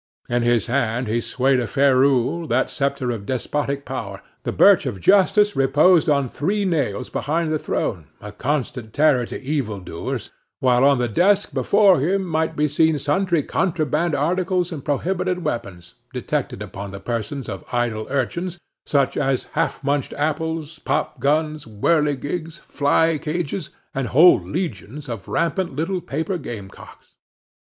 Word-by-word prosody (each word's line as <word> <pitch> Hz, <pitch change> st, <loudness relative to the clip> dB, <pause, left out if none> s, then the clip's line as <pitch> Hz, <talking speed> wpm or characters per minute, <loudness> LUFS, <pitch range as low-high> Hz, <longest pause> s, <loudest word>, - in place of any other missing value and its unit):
In 120 Hz, 0 st, 0 dB
his 120 Hz, -2 st, +2 dB
hand 120 Hz, -1 st, 0 dB
he 115 Hz, +2 st, 0 dB
swayed 130 Hz, +2 st, +1 dB
a 120 Hz, -, -2 dB
ferule, 140 Hz, +3 st, +2 dB
that 130 Hz, +1 st, +1 dB
sceptre 140 Hz, -3 st, -1 dB
of 105 Hz, -4 st, -6 dB
despotic 140 Hz, +2 st, -2 dB
power; -, -, -6 dB, 0.2 s
the -, -, -3 dB
birch -, -, +5 dB
of 95 Hz, -, -4 dB
justice 205 Hz, -, +4 dB
reposed 155 Hz, +5 st, +4 dB
on 140 Hz, -3 st, +2 dB
three 200 Hz, -, -1 dB
nails 140 Hz, -, -1 dB
behind 160 Hz, +2 st, -1 dB
the 155 Hz, -, 0 dB
throne, 95 Hz, -, -2 dB
a 105 Hz, -, -8 dB
constant 125 Hz, -1 st, -3 dB
terror 140 Hz, -5 st, +3 dB
to -, -, -6 dB
evil 130 Hz, -7 st, -2 dB
doers, 85 Hz, -2 st, -5 dB, 0.3 s
while 125 Hz, -1 st, +3 dB
on 140 Hz, -1 st, +5 dB
the 125 Hz, 0 st, 0 dB
desk 180 Hz, -, +2 dB
before 190 Hz, +7 st, +4 dB
him 190 Hz, +8 st, +1 dB
might 160 Hz, -1 st, -1 dB
be 150 Hz, 0 st, +2 dB
seen 160 Hz, +2 st, +2 dB
sundry 155 Hz, +3 st, +1 dB
contraband 160 Hz, -2 st, 0 dB
articles 180 Hz, +4 st, 0 dB
and 150 Hz, -5 st, -6 dB
prohibited 180 Hz, +4 st, -1 dB
weapons, 90 Hz, -7 st, -4 dB, 0.2 s
detected -, -, -3 dB
upon 100 Hz, +1 st, -7 dB
the 100 Hz, 0 st, -8 dB
persons 120 Hz, +5 st, -4 dB
of 95 Hz, -, -6 dB
idle 120 Hz, -3 st, -1 dB
urchins, 170 Hz, +7 st, -2 dB, 0.3 s
such 140 Hz, -2 st, +1 dB
as 135 Hz, -1 st, -1 dB
half -, -, -1 dB
munched 140 Hz, 0 st, -1 dB
apples, 155 Hz, +1 st, -2 dB
popguns, 150 Hz, +3 st, -1 dB
whirligigs, 150 Hz, +7 st, -1 dB
fly 150 Hz, +2 st, +1 dB
cages, 160 Hz, +2 st, -3 dB, 0.2 s
and 135 Hz, -2 st, -2 dB
whole 165 Hz, +9 st, +6 dB
legions 145 Hz, -, -5 dB
of 115 Hz, -6 st, -6 dB
rampant 170 Hz, -2 st, -1 dB
little 175 Hz, +5 st, -2 dB
paper 160 Hz, +6 st, -3 dB
gamecocks. 100 Hz, -9 st, -10 dB
145 Hz, 150 wpm, -22 LUFS, 125-165 Hz, 0.3 s, whole